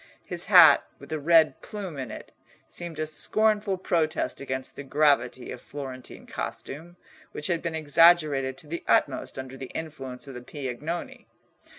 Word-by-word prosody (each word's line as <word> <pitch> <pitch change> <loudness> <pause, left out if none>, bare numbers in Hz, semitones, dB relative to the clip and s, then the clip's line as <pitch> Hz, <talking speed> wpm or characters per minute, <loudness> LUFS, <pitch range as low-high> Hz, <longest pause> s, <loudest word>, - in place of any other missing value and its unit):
His 175 -1 -4
hat, 175 -7 +8
with 140 - -14
a 155 - -2
red 160 +1 +4
plume 190 -8 -6
in 130 -3 -5
it, - - -9 0.4
seemed 170 -3 -5
a 155 - -1
scornful 210 +4 +1
protest 165 -5 -1
against 130 -1 -4
the - - -7
gravity 140 -3 +1
of - - -8
Florentine 130 -3 -8
costume, 165 +5 -6 0.4
which 150 - -4
had 170 -3 0
been 170 -2 -3
exaggerated 155 -3 +4
to 150 - -11
the 170 +3 -5
utmost - - +1
under 130 0 -7
the 130 -1 -7
influence 140 -5 -6
of 135 - -8
the 125 - -8
Piagnoni. 145 +5 -6
155 Hz, 160 wpm, -26 LUFS, 135-170 Hz, 0.4 s, hat